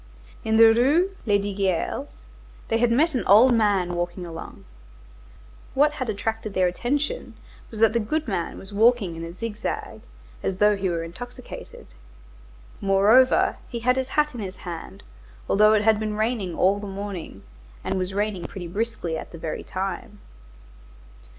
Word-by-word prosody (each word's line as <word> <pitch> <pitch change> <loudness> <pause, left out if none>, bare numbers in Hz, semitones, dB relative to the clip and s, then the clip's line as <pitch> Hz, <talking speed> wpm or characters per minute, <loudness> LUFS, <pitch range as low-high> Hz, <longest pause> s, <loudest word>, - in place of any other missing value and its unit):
In 220 0 +1
the 225 0 +8
Rue 295 +11 +3 0.2
Lesdiguières 200 - 0 0.6
they 225 - +1
had 240 0 +3
met 305 +7 +3
an 245 -6 0
old 230 +6 +7
man 200 -6 +2
walking 175 +1 -3
along. 165 -1 -9 1.1
What 295 +2 +4
had 260 -5 -4
attracted 220 0 -3
their 185 - +3
attention 280 - -2 0.3
was 220 - -9
that 225 -1 +5
the 235 - +2
goodman 220 - -2
was 195 +1 -11
walking 220 -4 +3
in 165 - -6
a 165 - -6
zig 210 +4 -6
zag, - - -4 0.4
as 190 - -2
though 210 +1 +4
he 195 -1 -1
were 170 -1 -2
intoxicated. 245 +9 -9 1.0
Moreover, 205 +6 +4
he 235 - -5
had 250 +2 +3
his 260 -1 -1
hat 300 +1 +1
in 240 - -7
his 190 -3 -5
hand, 165 - -8 0.4
although 215 +2 +5
it 210 -1 +3
had 220 -1 +4
been 215 -1 -3
raining 215 -6 -1
all 195 +2 +3
the 205 - -6
morning, 195 - -6 0.4
and - - -1
was 185 +1 -2
raining 200 -2 -2
pretty 180 -3 -7
briskly 195 -4 -3
at - - -10
the 170 - -9
very 160 -1 -4
time. 195 +2 -5
210 Hz, 160 wpm, -24 LUFS, 185-235 Hz, 1.1 s, the